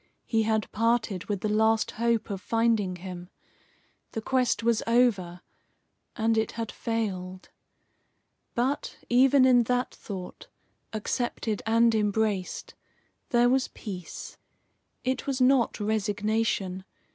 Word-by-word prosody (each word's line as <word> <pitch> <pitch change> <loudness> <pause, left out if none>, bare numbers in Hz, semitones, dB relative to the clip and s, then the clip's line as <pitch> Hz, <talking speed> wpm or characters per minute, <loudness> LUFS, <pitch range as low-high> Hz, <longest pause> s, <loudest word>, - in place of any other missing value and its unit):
He 225 -2 +1
had 220 -1 +1
parted 225 -4 0
with 200 -3 -3
the - - 0
last 220 +1 +2
hope 230 -1 0
of 195 -2 -4
finding 225 -5 +1
him. 180 0 -8 0.8
The 225 - -3
quest 250 -2 +1
was 230 -1 +2
over, 205 -8 +2 0.7
and 225 0 +2
it 220 - -2
had 230 -2 -4
failed. 190 -5 -3 1.1
But, 260 +4 -1
even 260 +2 +5
in 245 -2 +5
that 250 +1 0
thought, 185 -3 -8 0.4
accepted 220 0 -2
and 230 +1 +4
embraced, 210 -3 -1 0.6
there 240 0 +4
was 260 +1 +2
peace. 185 -6 -8 0.7
It 260 +2 -2
was 270 -1 -1
not 255 -2 +3
resignation. 210 -2 -1
225 Hz, 115 wpm, -27 LUFS, 205-240 Hz, 1.1 s, even